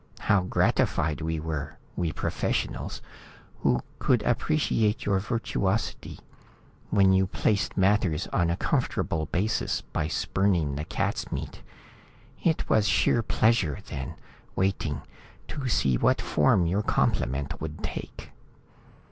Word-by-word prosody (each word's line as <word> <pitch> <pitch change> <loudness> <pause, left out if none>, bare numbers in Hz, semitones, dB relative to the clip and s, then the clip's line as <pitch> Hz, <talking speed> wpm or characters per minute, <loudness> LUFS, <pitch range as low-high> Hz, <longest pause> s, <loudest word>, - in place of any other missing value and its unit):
How 100 -3 +3
gratified 80 -3 +1
we 80 0 -1
were, 75 -2 -4 0.2
we 85 -3 -1
professionals, - - -2 0.6
who 65 - +2 0.2
could 120 -4 +2
appreciate 120 -4 +1
your 100 -1 +2
virtuosity 105 -1 -2 0.7
when 95 -2 +5
you 95 0 +3
placed 100 0 0
matters 95 -4 +2
on 85 -2 +2
a 85 - 0
comfortable 80 -2 0
basis 105 +5 0
by 75 - -3
spurning 85 -3 +1
the 75 +3 -3
cats' - - -2
meat. - - -5 0.8
It 160 -2 +1
was 110 -1 +3
sheer 120 - +3
pleasure 110 -9 +2
then, 65 -2 -5 0.4
waiting, 85 -7 -1 0.5
to 140 -3 -4
see 65 - +2
what - - +3
form 90 -3 +3
your 95 +5 +1
compliment 70 - 0
would 80 0 -6
take." - - -6
95 Hz, 120 wpm, -27 LUFS, 80-105 Hz, 0.8 s, when